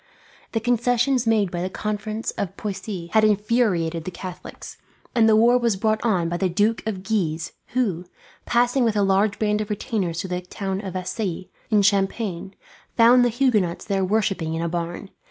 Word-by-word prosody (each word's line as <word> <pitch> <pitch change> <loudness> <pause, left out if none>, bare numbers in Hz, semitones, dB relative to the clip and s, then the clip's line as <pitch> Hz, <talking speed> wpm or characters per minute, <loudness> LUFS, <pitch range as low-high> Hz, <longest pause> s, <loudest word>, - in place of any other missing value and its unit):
The 225 - +1
concessions 245 +1 +1
made 210 -5 +2
at 175 - -2
the 185 - -2
Conference 215 +2 -3
of 195 0 -5
Poissy 190 -3 -5
had 220 -1 +5
infuriated 205 -6 +1
the 185 - -4
Catholics, 180 0 -9 0.4
and 225 -2 +4
the 215 - +5
war 240 +3 +5
was 235 -4 +1
brought 215 +2 0
on 190 -8 +1
by 175 +1 -2
the 190 0 0
Duke 210 +5 +1
of 190 -4 -3
Guise 170 -6 -1 0.2
who, 195 -9 0 0.4
passing 245 +2 +2
with 225 -2 +1
a 205 - +2
large 195 +2 +2
band 210 -1 +1
of 210 - -5
retainers 195 -5 -2
through 190 - -4
the 180 0 -2
town 190 +1 -4
of 190 -3 -6
Vassy 185 0 -4 0.2
in 210 -3 +3
Champagne, 195 -2 0 0.4
found 245 +2 +7
the 245 - +3
Huguenots 220 -8 +1
there 195 -2 0
worshipping 185 -5 0
in 165 - -2
a - - 0
barn. 175 +3 -4
205 Hz, 180 wpm, -23 LUFS, 180-225 Hz, 0.4 s, found